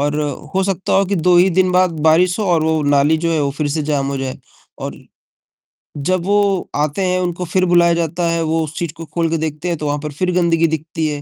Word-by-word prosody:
और 145 +1 0 0.4
हो 190 - +2
सकता 190 -1 -2
हो 195 - +4
कि 200 - -1
2 175 +1 +3
ही 180 +2 +5
दिन 185 +1 +2
बाद 185 0 +3 0.2
बारिश 175 +4 +3
हो 215 - -1
और 170 -4 +2
वो 160 -1 +1
नाली 145 +2 +3
जो 165 +1 -1
है, 160 - +1
वो 140 - 0
फिर 150 -2 0
से 155 +2 -1
जाम 145 -2 -1
हो 140 - -3
जाए 130 -1 -4 0.4
और - - -6 1.0
जब 175 +5 -1
वो 200 -2 +1
आते 150 +5 -1
हैं, 185 0 +1
उनको 180 0 -2
फिर 185 +2 +1
बुलाया 175 -1 +4
जाता 170 +1 -1
है, 165 0 0
वो 160 0 0
उस 155 0 -8
चीज़ 170 -3 -3
को 165 - -7
खोल 165 +2 -2
के 165 - 0
देखते 155 +2 -4
हैं, 170 - -1
तो 150 - -5
वहाँ 145 0 -1
पर 150 - -4
फिर 180 +5 -1
गंदगी 170 -2 +2
दिखती 160 +1 -3
है, 145 -1 -4
165 Hz, 250 wpm, -18 LUFS, 150-180 Hz, 1.0 s, ही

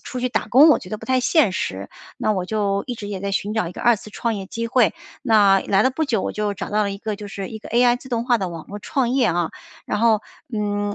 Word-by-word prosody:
出 250 - -6
去 250 - 0
打 - - -1
工， 275 +7 +7
我 305 - +5
觉 180 - -11
得 215 - -4
不 - - -10
太 260 0 +2
现 300 - +3
实， 95 - -3 0.3
那 215 - +1
我 185 -3 -2
就 200 -2 -1
一 245 - -3
直 205 -2 -7
也 195 -2 -5
在 200 0 -3
寻 205 +2 -1
找 215 -6 0
一 180 - -9
个 - - -8
二 240 -1 +5
次 215 - -12
创 230 +1 -2
业 195 -2 -5
机 230 +3 -4
会。 230 -6 +3 0.3
那 205 -5 +5
来 195 0 +2
了 260 - +3
不 315 +4 -1
久， 230 -8 0
我 - - -2
就 210 -1 -1
找 - - -5
到 210 +1 +2
了 200 - -1
一 195 - -5
个 215 -1 -4
就 205 - -8
是 195 -1 -6
一 220 - -7
个 - - -11
AI 240 +1 +4
自 260 - -13
动 235 -2 -1
化 245 -1 +3
的 190 -2 -2
网 165 -2 -8
络 205 - -7
创 245 +3 -1
业 255 -2 +2
啊。 175 -2 0 0.3
然 210 - -2
后， 225 -2 +4 0.3
嗯， 205 -1 -1
215 Hz, 320 characters per minute, -22 LUFS, 200-240 Hz, 0.3 s, 工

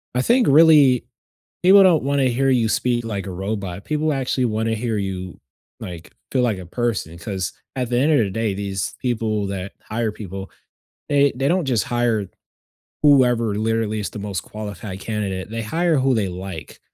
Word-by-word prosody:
I 125 - +2
think 240 -1 +3
really, 145 -4 +6 0.6
people 195 +2 +8
don't 170 -7 +4
wanna 140 -1 +2
hear 135 +3 +1
you 115 -3 +2
speak 120 +1 0
like 105 -3 -4
a 95 - -5
robot. 95 0 -4
People 155 0 0
actually 130 -1 0
wanna 110 0 0
hear 110 0 -2
you, 95 -2 -5 0.4
like, 85 -1 -9 0.2
feel 130 - +2
like 110 -5 +1
a 90 - -8
person, 105 -7 -2
'cause 95 0 -4 0.2
at 125 -2 -2
the 120 - +1
end 145 +5 +3
of 145 - +4
the 105 -4 +1
day, 110 -1 -1
these 95 -2 -3
people 110 -5 -1
that 95 0 -5
hire 110 0 -2
people, 95 -2 -8 0.6
they 140 -1 +3
they 135 +2 +1
don't 180 0 +1
just 120 -5 +1
hire 120 -5 0 0.8
whoever, 125 -6 +4
literally, 110 0 -1
is 100 -5 -4
the - - -8
most 100 -3 -3
qualified 105 -2 -7
candidate. 100 -3 -3
They 115 0 -3
hire 165 +6 +1
who 130 0 +2
they 105 -3 0
like, 90 -3 -8
110 Hz, 180 wpm, -21 LUFS, 100-130 Hz, 0.8 s, people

